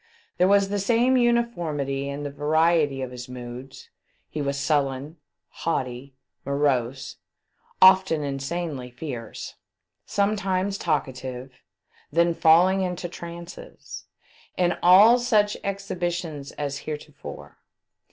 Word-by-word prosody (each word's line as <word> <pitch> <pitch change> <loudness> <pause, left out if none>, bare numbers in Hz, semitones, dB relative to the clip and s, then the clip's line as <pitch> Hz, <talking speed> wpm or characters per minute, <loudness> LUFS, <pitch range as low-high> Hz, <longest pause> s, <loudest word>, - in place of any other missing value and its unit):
There 180 - +5
was 200 0 +4
the 205 0 -1
same 235 +5 +3
uniformity 170 - 0
in 140 +1 -5
the 145 - -4
variety 150 -1 +2
of 130 - -6
his 125 0 -8
moods; 125 +1 -9 0.4
he 155 - -3
was 140 0 -1
sullen, 140 +1 -1 0.3
haughty, 130 -4 -4 0.3
morose, 135 -2 -1 0.7
often 185 -5 +6
insanely 140 -1 -4
fierce, 125 -3 -7 0.5
sometimes 200 -1 0
talkative, 130 -4 -3 0.6
then 170 +2 +3
falling 175 +4 +5
into 180 -1 -3
trances, 170 - -10 0.5
in 175 -1 +2
all 205 +7 +7
such 215 -4 +2
exhibi 195 -3 -2
tions 155 -5 -6
as 145 -1 -4
heretofore. 150 -1 -8
160 Hz, 105 wpm, -25 LUFS, 140-185 Hz, 0.7 s, all